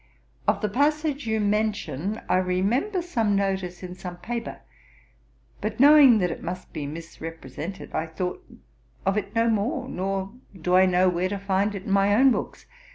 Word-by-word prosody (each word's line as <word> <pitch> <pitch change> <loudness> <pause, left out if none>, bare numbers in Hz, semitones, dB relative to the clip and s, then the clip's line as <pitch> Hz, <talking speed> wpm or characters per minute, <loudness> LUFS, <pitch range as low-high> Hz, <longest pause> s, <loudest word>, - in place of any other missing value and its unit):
Of - - +2
the 210 - +1
passage 290 +4 0
you 220 0 +1
mention, 210 -3 -1
I - - +3
remember 205 - 0
some 225 - 0
notice 190 -2 -2
in 180 -1 -6
some 180 -1 -8
paper; 235 +5 -5 1.0
but 215 +1 -3
knowing 280 -3 +8
that 180 -4 +1
it - - -6
must 180 +1 -6
be 145 -2 -4
misrepresented, 165 +1 -8
I 160 +1 -1
thought 180 - -4 0.6
of 195 +1 +2
it 210 0 -3
no 230 0 +3
more, 230 +4 0
nor 195 -3 -3 0.3
do 180 +2 +1
I 185 0 +6
know 185 0 +3
where 180 +1 +1
to 200 - -2
find 200 +1 0
it 190 - -6
in 200 - -5
my 200 +1 +4
own 265 +4 +6
books. - - -3
195 Hz, 170 wpm, -25 LUFS, 180-225 Hz, 1.0 s, knowing